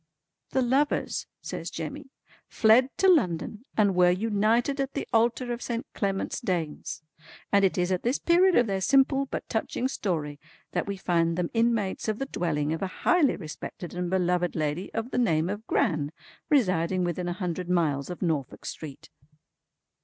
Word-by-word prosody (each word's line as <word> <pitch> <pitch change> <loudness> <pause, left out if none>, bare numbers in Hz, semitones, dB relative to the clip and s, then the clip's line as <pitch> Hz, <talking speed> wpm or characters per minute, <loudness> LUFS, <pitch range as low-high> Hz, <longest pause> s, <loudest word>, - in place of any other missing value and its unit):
"The 265 - +1
lovers" 270 +4 0 0.2
says - - -5
Jemmy 270 - -6 0.4
"fled 235 +4 +4
to 385 - +3
London 215 - +2
and 205 -3 +4
were 180 0 +5
united 225 +7 +1
at 270 0 -3
the - - -3
altar 240 +2 +2
of 240 - -6
Saint 235 +2 -3
Clement's 195 -1 -2
Danes. 165 -4 -3 0.5
And 200 -1 +4
it 195 - +2
is 180 +1 +1
at 185 - 0
this 245 +4 +1
period 360 +2 +4
of 245 - +5
their 195 -3 -2
simple 275 +5 +3
but - - -5
touching 230 +3 -1
story 155 - -3 0.3
that - - -2
we 200 -1 -3
find 170 -2 +1
them 180 -1 -1
inmates 230 -4 +1
of 215 -1 0
the 270 - -2
dwelling 155 - -1
of 165 - -4
a 195 - 0 0.2
highly 350 -6 +4
respected 165 0 -8
and 180 0 -2
beloved 180 -1 +1
lady 155 +4 -2
of 225 +3 -4
the - - 0
name 165 -8 +2
of 210 +3 -5
Gran, 150 -3 +1 0.4
residing 185 - +2
within 175 0 -2
a 175 - -1
hundred 180 -1 -4
miles 155 -5 +1
of 180 +1 -5
Norfolk 155 -7 -2
Street." 145 -4 -8
195 Hz, 170 wpm, -27 LUFS, 175-240 Hz, 0.5 s, were